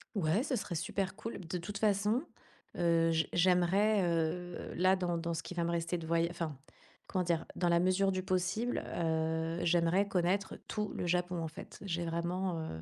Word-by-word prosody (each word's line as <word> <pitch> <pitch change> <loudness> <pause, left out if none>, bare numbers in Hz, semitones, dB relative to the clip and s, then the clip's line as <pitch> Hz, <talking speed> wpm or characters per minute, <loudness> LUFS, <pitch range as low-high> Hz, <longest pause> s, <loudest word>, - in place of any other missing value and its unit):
Ouais, 185 +4 +2
ce 275 -2 -1
serait 185 -7 -3
super 190 +4 -2
cool. 225 0 -5
De 180 -1 -4
toute 185 +4 -5
façon, 210 +5 +2 0.5
heu, 165 -1 +3
j 160 0 +1
j'aimerais, 185 +4 +4
heu, 175 +1 -1
là 185 +2 +4
dans 175 -2 -1
dans 170 0 -2
ce 165 +1 -3
qui - - -7
va 170 -1 0
me 170 - 0
rester 170 +1 -1
de 165 -1 -7
voya 165 0 +2
enfin, 165 -4 -4 0.5
comment 185 -1 0
dire, 170 -2 0
dans 175 - +1
la 170 0 +4
mesure 185 +2 +3
du 185 0 -2
possible, 190 +6 0 0.2
heu, 160 0 0
j'aimerais 175 +3 +3
connaître 190 +1 0
tout 210 -1 -1
le - - -2
Japon, 175 0 0
en 160 - -3
fait. 155 - -10
J'ai 175 -2 -1
vraiment, 170 +1 -1
heu 80 - -6
175 Hz, 190 wpm, -33 LUFS, 165-190 Hz, 0.5 s, j'aimerais